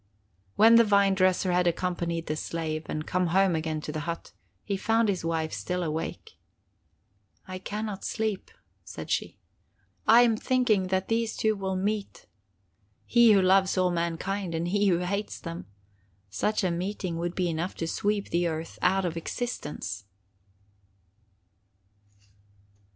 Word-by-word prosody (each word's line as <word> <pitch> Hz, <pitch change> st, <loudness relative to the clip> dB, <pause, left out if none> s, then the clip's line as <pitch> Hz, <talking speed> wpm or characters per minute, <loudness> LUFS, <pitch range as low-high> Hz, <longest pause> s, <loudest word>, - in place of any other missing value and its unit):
When 230 Hz, +2 st, +7 dB
the 235 Hz, -, +7 dB
vine 200 Hz, -2 st, +4 dB
dresser 185 Hz, -1 st, +2 dB
had 180 Hz, 0 st, +2 dB
accompanied 170 Hz, -1 st, -1 dB
the 155 Hz, -, -2 dB
slave, 155 Hz, 0 st, -4 dB
and 155 Hz, 0 st, -4 dB
come 180 Hz, 0 st, 0 dB
home 190 Hz, +1 st, +3 dB
again 160 Hz, -1 st, -2 dB
to 150 Hz, -, -5 dB
the 155 Hz, -, -4 dB
hut, 170 Hz, -, -5 dB, 0.3 s
he 200 Hz, -, -2 dB
found 225 Hz, +3 st, +2 dB
his 190 Hz, -4 st, -1 dB
wife 160 Hz, -1 st, -1 dB
still 180 Hz, 0 st, -2 dB
awake. 160 Hz, 0 st, -5 dB, 1.1 s
"I 185 Hz, 0 st, -6 dB
can 210 Hz, +3 st, -4 dB
not 200 Hz, -3 st, -6 dB
sleep," 220 Hz, -4 st, -2 dB, 0.3 s
said -, -, -8 dB
she. -, -, -1 dB, 0.7 s
"I 230 Hz, +2 st, +8 dB
am 230 Hz, -2 st, +3 dB
thinking 225 Hz, -7 st, +2 dB
that 190 Hz, 0 st, 0 dB
these 225 Hz, 0 st, -1 dB
two 220 Hz, -1 st, +2 dB
will 190 Hz, -1 st, -3 dB
meet: 205 Hz, +2 st, -3 dB, 0.8 s
he 235 Hz, -2 st, +6 dB
who 195 Hz, -2 st, +4 dB
loves 190 Hz, +1 st, +4 dB
all 185 Hz, -1 st, +3 dB
mankind, 170 Hz, +2 st, -2 dB
and 170 Hz, +2 st, -1 dB
he 205 Hz, +2 st, +2 dB
who 180 Hz, -3 st, +4 dB
hates 200 Hz, +4 st, -3 dB
them. 170 Hz, 0 st, -7 dB, 0.6 s
Such 210 Hz, -, 0 dB
a 185 Hz, -, +1 dB
meeting 180 Hz, 0 st, -3 dB
would 175 Hz, +1 st, -3 dB
be 180 Hz, -2 st, 0 dB
enough 170 Hz, +2 st, -2 dB
to 165 Hz, -, -3 dB
sweep 205 Hz, +4 st, -1 dB
the 175 Hz, +1 st, +2 dB
earth 160 Hz, 0 st, -5 dB
out 190 Hz, +1 st, +2 dB
of 170 Hz, -2 st, -2 dB
existence!" 150 Hz, -, -5 dB
185 Hz, 150 wpm, -27 LUFS, 170-205 Hz, 1.1 s, I